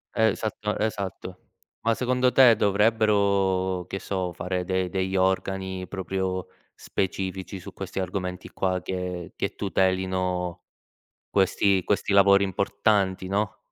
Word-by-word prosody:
Esatto 110 -1 0
esatto. 105 -4 -3 0.4
Ma 115 0 +2
secondo 125 0 +1
te 125 -4 +7
dovrebbero, 100 -3 +2
che 95 - -3
so, 95 -2 -3
fare 90 +1 -3
de 95 0 0
degli 95 +1 -2
organi 95 0 0
proprio 95 -1 -3 0.3
specifici 95 0 -3
su - - -10
questi - - -5
argomenti 90 0 -4
qua 95 -1 0
che 90 -1 -4
che - - -3
tutelino 95 -2 0 0.7
questi 95 -1 +2
questi 100 0 0
lavori 100 0 +6
importanti, 100 -1 +1
no? 100 +1 -1
95 Hz, 115 wpm, -26 LUFS, 95-100 Hz, 0.7 s, te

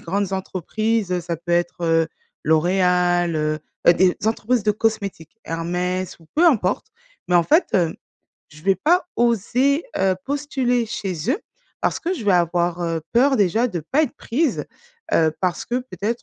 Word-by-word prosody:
grandes 195 +2 -2
entreprises, 190 +1 -1
ça 170 0 -4
peut 170 +2 -4
être, 175 0 0
heu, 165 -1 +2 0.4
L'Oréal, 175 +1 +2
heu, 155 0 0 0.3
heu, 170 - +9
des 180 0 +3
entreprises 225 0 0
de 210 - +4
cosmétiques, 210 -4 -3
Hermès 180 +2 -3
ou 165 - -20
peu 330 - +4
importe. 260 - +2 0.4
Mais 180 - +4
en 170 - +4
fait, 315 - +3
heu, 170 -4 +2 0.5
je 155 0 -16
vais 195 +1 +3
pas 355 +4 +2
oser, 240 - +2 0.2
heu, 190 -1 +2
postuler 265 -4 0
chez 195 -2 -2
eux 365 - -3 0.4
parce - - 0
que 355 +3 -2
je 240 - -7
vais 200 - +4
avoir, 175 0 +1
heu, 165 -1 -1
peur 265 +3 +4
déjà 210 +4 +2
de 180 -8 -4
pas 270 - +1
être 275 - -7
prise, 300 +7 -1 0.5
heu, 160 -1 +3
parce 180 -2 -1
que 240 - -4
peut-être, 235 -2 -4
190 Hz, 165 wpm, -22 LUFS, 175-235 Hz, 0.5 s, heu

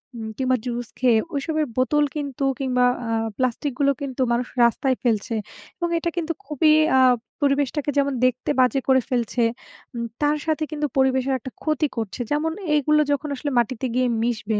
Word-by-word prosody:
উম 220 -1 -6
কিংবা 255 -1 +2
জুস 240 -1 -3
খেয়ে 245 -3 +4 0.2
ওইসবের 310 +2 -1
বোতল 295 +4 +3
কিন্তু 280 -2 -4 0.2
কিংবা 250 -2 +2 0.2
আ - - -1 0.3
প্লাস্টিক 255 +3 -1
গুলো 280 0 +4
কিন্তু 265 -1 -4
মানুষ 240 +1 0 0.2
রাস্তায় 255 +3 +2
ফেলছে। 225 0 0 0.4
এবং 345 -1 -1
এটা 340 +1 -1
কিন্তু 330 0 -1
খুবই 305 +1 +3 0.2
আ - - +6 0.4
পরিবেশটাকে 285 +1 +1
যেমন 280 -1 +2
দেখতে 255 +2 0
বাজে 255 +2 +4
করে 260 -1 +5
ফেলছে, 240 -1 0 0.5
উম 235 0 -2 0.2
তার 295 +1 +2
সাথে 315 0 0
কিন্তু 295 -1 -1
পরিবেশের 265 0 +2
একটা 255 +2 -8
ক্ষতি 305 -1 +1
করছে। 225 +2 -3
যেমন 310 +2 +1 0.2
এইগুলো 300 +1 +3
যখন 285 +1 -1
আসলে 290 +2 -3
মাটিতে 240 +2 -1
গিয়ে 255 0 +2 0.2
মিশবে, 220 -3 -1
265 Hz, 170 wpm, -23 LUFS, 250-295 Hz, 0.5 s, আ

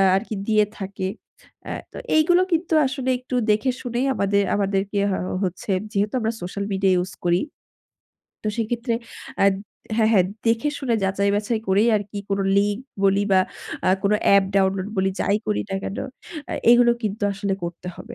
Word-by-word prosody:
আরকি 215 +2 -2
দিয়ে 215 -1 +4
থাকে। 195 -1 -4 0.6
আ - - -3 0.2
তো - - -10 0.2
এইগুলো 345 +3 +5
কিন্তু 330 0 0
আসলে 260 -1 -2
একটু 255 0 -5 0.2
দেখেশুনেই 245 +2 0
আমাদের, 200 -2 +2
আমাদেরকে 200 0 0
হ - - +1 0.3
হচ্ছে 185 +2 -3 0.2
যেহেতু 205 0 0
আমরা 225 0 -1
সোশ্যাল 190 +3 -4
মিডিয়া 190 -1 +2
ইউস 180 +1 -2
করি। 175 0 +3 1.0
তো - - -5
সেক্ষেত্রে 235 +1 -1 0.5
আদ 200 -1 +5 0.4
হ্যাঁ, 220 -1 +4
হ্যাঁ 190 -5 +5 0.2
দেখে 230 +5 +2
শুনে 255 -5 0
যাচাই-বাছাই 200 +3 0
করেই 200 +4 +4
আরকি 205 0 -5
কোন 195 0 0 0.2
লিঙ্ক 205 +1 +2 0.3
বলি 195 +1 +4
বা 190 - +6 0.5
আ - - +4
কোন 200 0 +2
অ্যাপ 200 -1 +6
ডাউনলোড 190 0 +2
বলি 190 0 +2
যাই 200 - +2
করি 210 - 0
না 195 - -1
কেন 195 - -4 0.5
আ - - -2 0.2
এগুলো 240 0 +6
কিন্তু 215 0 -3
আসলে 195 0 -2
করতে 170 +1 -5
হবে। 235 +1 -10
205 Hz, 160 wpm, -23 LUFS, 195-230 Hz, 1.0 s, বা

